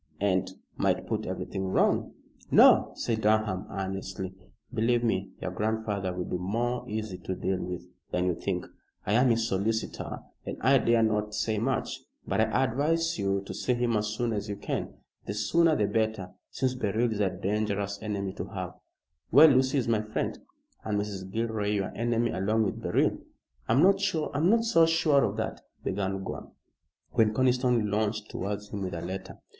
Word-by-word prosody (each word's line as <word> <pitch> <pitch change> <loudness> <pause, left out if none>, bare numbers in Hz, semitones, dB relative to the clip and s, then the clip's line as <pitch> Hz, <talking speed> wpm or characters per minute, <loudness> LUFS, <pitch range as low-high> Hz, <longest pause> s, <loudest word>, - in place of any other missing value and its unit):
"And 95 -2 +1 0.3
might - - +1
put - - -2
everything 95 0 -3
wrong." 95 - +2 0.4
"No," - - +7
said 110 -2 -1
Durham, 105 -3 +1
earnestly, 95 -1 -4 0.4
"believe 120 +2 +2
me, 95 -4 0
your 95 - -4
grandfather 105 -1 -1
will 90 0 -3
be 90 - -3
more 120 +7 -1
easy 105 -3 -4
to 95 +1 -4
deal 95 0 -1
with 90 -1 -5 0.3
than 90 0 0
you 90 - +2
think. 90 +1 -3 0.4
I 105 - 0
am 125 +3 +5
his 115 -1 +2
solicitor 110 +3 -2 0.2
and - - -5
I 135 +2 +5
dare 115 -1 +3
not 105 -1 0
say 110 0 0
much, 130 +4 -1 0.3
but - - +1
I 110 +4 +2
advise 155 +5 +1
you 100 0 0
to - - -6
see 125 - 0
him 120 -1 +1
as 105 0 +1
soon 115 +2 -1
as 105 0 -3
you 100 - -2
can. 100 - -3 0.4
The 100 - -3
sooner 165 +10 +3
the 105 - +2
better, 110 -4 -1 0.2
since 130 -1 -1
Beryl 115 0 0
is 105 - -4
a 100 -2 +3
dangerous 100 +1 -2
enemy 100 -3 -3
to - - -3
have." - - -5 0.6
"Well, 150 +6 +9
Lucy 130 0 +3
is 125 - 0
my 115 -2 +2
friend." 110 0 -3 0.4
"And 105 -2 -1
Mrs. 100 -2 -4
Gilroy 110 -1 -1
your 100 -2 -1
enemy 120 0 +1
along 110 +4 +1
with 100 - -2
Beryl." - - +1 0.5
"I'm 130 +8 +5
not 195 +1 +5
so 185 +3 +3
sure 155 -4 +3
of 100 +1 -1
that," 110 0 -3 0.2
began 95 0 -2
Gore, - - -6 0.6
when 110 -1 +3
Conniston 125 -4 +2
lounged 105 0 -1
towards 100 +1 -4
him 100 - -5
with 90 -2 -3
a 85 - -4
letter. 95 +2 -6
110 Hz, 175 wpm, -28 LUFS, 100-120 Hz, 0.6 s, Well